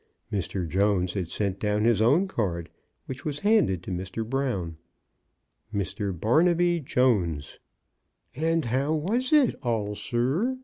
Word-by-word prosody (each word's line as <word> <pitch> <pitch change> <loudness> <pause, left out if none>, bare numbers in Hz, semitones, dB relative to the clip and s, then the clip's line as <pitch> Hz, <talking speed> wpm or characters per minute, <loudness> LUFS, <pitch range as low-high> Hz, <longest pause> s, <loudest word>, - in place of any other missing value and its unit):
Mr. 95 -2 -2
Jones 95 0 +1
had 90 -5 -3
sent 100 -1 -2
down 105 0 0
his 115 -2 +3
own 150 - +4
card, 90 - -3 0.3
which 130 +1 -7
was 145 -2 -2
handed 145 - +2
to - - -6
Mr. 95 +5 -4
Brown: 115 -11 -2 0.9
Mr. 100 0 -2
Barnaby 170 - +2
Jones." 105 - 0 0.4
*' - - -41 0.2
And 165 -4 +1
how 135 +6 0
was 225 +12 -1
it 295 -6 +5
all, 110 -4 -1
sir? 135 - -1
115 Hz, 135 wpm, -26 LUFS, 95-155 Hz, 0.9 s, it